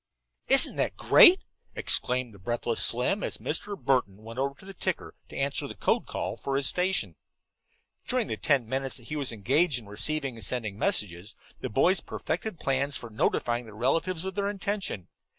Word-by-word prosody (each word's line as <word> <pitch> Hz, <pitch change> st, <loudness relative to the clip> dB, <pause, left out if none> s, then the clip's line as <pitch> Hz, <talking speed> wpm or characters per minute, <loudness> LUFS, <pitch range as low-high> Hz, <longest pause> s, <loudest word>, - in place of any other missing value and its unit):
"Isn't 270 Hz, 0 st, +4 dB
that -, -, -1 dB
great?" 370 Hz, 0 st, +7 dB, 0.3 s
exclaimed 125 Hz, -2 st, +1 dB
the 100 Hz, -, -15 dB
breathless 120 Hz, +3 st, 0 dB
Slim, 125 Hz, -, +2 dB
as -, -, -3 dB
Mr. 200 Hz, +6 st, -2 dB
Burton 125 Hz, -7 st, 0 dB
went 115 Hz, +3 st, -8 dB
over 140 Hz, +1 st, -1 dB
to 190 Hz, -, -16 dB
the 195 Hz, -, -9 dB
ticker 185 Hz, -1 st, -3 dB, 0.2 s
to -, -, -8 dB
answer 140 Hz, 0 st, -1 dB
the -, -, -8 dB
code -, -, 0 dB
call -, -, -3 dB
for 135 Hz, 0 st, -2 dB
his 140 Hz, -, 0 dB
station. 185 Hz, +6 st, +1 dB, 0.9 s
During 250 Hz, -3 st, +1 dB
the -, -, -3 dB
ten 135 Hz, -6 st, +1 dB
minutes 135 Hz, +2 st, -2 dB
that 120 Hz, -2 st, -9 dB
he 155 Hz, -, -3 dB
was 140 Hz, -3 st, -1 dB
engaged 135 Hz, -, +2 dB
in 115 Hz, -, -8 dB
receiving 125 Hz, +5 st, -2 dB
and 110 Hz, -, -6 dB
sending 110 Hz, -3 st, -1 dB
messages, 100 Hz, 0 st, -1 dB, 0.2 s
the -, -, -4 dB
boys 175 Hz, -, +4 dB
perfected 175 Hz, +2 st, -4 dB
plans 140 Hz, +1 st, 0 dB
for 120 Hz, -, -8 dB
notifying 120 Hz, +2 st, 0 dB
their 110 Hz, -1 st, -12 dB
relatives 165 Hz, -, 0 dB
of 190 Hz, -, -3 dB
their 200 Hz, 0 st, -1 dB
intention. 200 Hz, -, -3 dB
135 Hz, 185 wpm, -28 LUFS, 115-180 Hz, 0.9 s, great